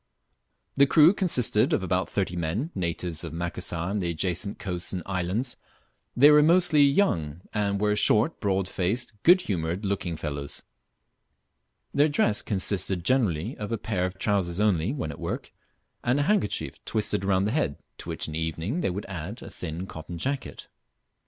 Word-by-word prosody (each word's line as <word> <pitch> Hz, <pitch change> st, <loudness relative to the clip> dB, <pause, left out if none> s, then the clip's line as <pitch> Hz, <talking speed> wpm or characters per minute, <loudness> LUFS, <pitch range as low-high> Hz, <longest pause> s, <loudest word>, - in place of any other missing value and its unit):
The 140 Hz, 0 st, +6 dB
crew 160 Hz, +5 st, +6 dB
consisted 125 Hz, -, +1 dB
of -, -, +1 dB
about 90 Hz, 0 st, 0 dB
thirty 95 Hz, -3 st, -1 dB
men, 90 Hz, -, -2 dB
natives 85 Hz, -2 st, -3 dB
of 85 Hz, -, -6 dB
Macassar 85 Hz, +1 st, -3 dB
and 105 Hz, 0 st, -1 dB
the 85 Hz, -, -1 dB
adjacent 90 Hz, +4 st, -2 dB
coasts 90 Hz, -3 st, -4 dB
and 90 Hz, -2 st, -3 dB
islands. 95 Hz, +7 st, -1 dB, 0.6 s
They 145 Hz, +4 st, +8 dB
were 150 Hz, 0 st, +7 dB
mostly 165 Hz, -1 st, +4 dB
young, 95 Hz, -, +2 dB
and 100 Hz, -2 st, 0 dB
were 105 Hz, 0 st, +2 dB
short, 110 Hz, +7 st, +3 dB
broad 95 Hz, -2 st, 0 dB
faced, 105 Hz, +6 st, -1 dB
good 180 Hz, +2 st, +6 dB
humoured 90 Hz, -, -2 dB
looking 95 Hz, -4 st, -2 dB
fellows. 70 Hz, -2 st, -5 dB, 1.3 s
Their 145 Hz, +2 st, +4 dB
dress 115 Hz, -8 st, +2 dB
consisted 95 Hz, -2 st, 0 dB
generally 110 Hz, -, +1 dB
of 105 Hz, +1 st, -5 dB
a 115 Hz, -, 0 dB
pair 90 Hz, -5 st, -1 dB
of 90 Hz, +1 st, -9 dB
trousers 95 Hz, -3 st, 0 dB
only, 100 Hz, -2 st, +2 dB
when 130 Hz, -, -3 dB
at 70 Hz, -, -10 dB
work, -, -, -5 dB, 0.5 s
and 125 Hz, +4 st, +2 dB
a -, -, +2 dB
handkerchief 200 Hz, -, -1 dB
twisted 105 Hz, -2 st, 0 dB
round 95 Hz, 0 st, +2 dB
the 105 Hz, -, 0 dB
head, 100 Hz, -, 0 dB, 0.2 s
to -, -, -7 dB
which -, -, -1 dB
in -, -, -6 dB
the 80 Hz, -, -2 dB
evening 80 Hz, -, -2 dB
they -, -, 0 dB
would 95 Hz, +3 st, -4 dB
add 95 Hz, +5 st, -7 dB
a -, -, -9 dB
thin 85 Hz, +1 st, -5 dB
cotton 85 Hz, -1 st, -8 dB
jacket. 135 Hz, +8 st, -4 dB
100 Hz, 170 wpm, -26 LUFS, 85-120 Hz, 1.3 s, They